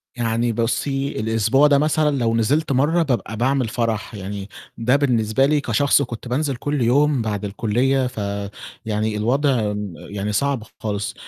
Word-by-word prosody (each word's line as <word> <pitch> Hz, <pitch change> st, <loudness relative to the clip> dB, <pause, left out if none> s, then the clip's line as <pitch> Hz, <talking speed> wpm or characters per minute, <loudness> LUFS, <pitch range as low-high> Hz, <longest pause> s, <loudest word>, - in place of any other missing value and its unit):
يعني 115 Hz, 0 st, 0 dB
بُصّي، 135 Hz, +5 st, -1 dB
الأسبوع 115 Hz, +6 st, +3 dB
ده 140 Hz, -1 st, +4 dB
مثلًا 150 Hz, -1 st, +2 dB
لو 115 Hz, -2 st, +1 dB
نزلت 140 Hz, +7 st, +1 dB
مرّة 155 Hz, +6 st, +2 dB
بابقى 115 Hz, -6 st, -2 dB
باعمل 130 Hz, 0 st, +1 dB
فرح، 115 Hz, -1 st, -2 dB
يعني 100 Hz, 0 st, -6 dB, 0.3 s
ده 125 Hz, +4 st, +2 dB
بالنسبة 125 Hz, -3 st, +2 dB
لي 150 Hz, 0 st, +2 dB
كشخص 140 Hz, +3 st, +2 dB
كنت 120 Hz, -2 st, -5 dB
بانزل 135 Hz, +2 st, -1 dB
كل 145 Hz, +2 st, -2 dB
يوم 140 Hz, +2 st, +3 dB
بعد 105 Hz, -2 st, -3 dB
الكُلّية، 125 Hz, +6 st, +1 dB
فيعني 105 Hz, 0 st, -4 dB
الوضع 120 Hz, -2 st, +1 dB
م 105 Hz, -3 st, -5 dB
يعني 105 Hz, +1 st, -5 dB
صعب 140 Hz, 0 st, 0 dB, 0.2 s
خالص. 105 Hz, -1 st, -3 dB
120 Hz, 150 wpm, -21 LUFS, 105-140 Hz, 0.3 s, ده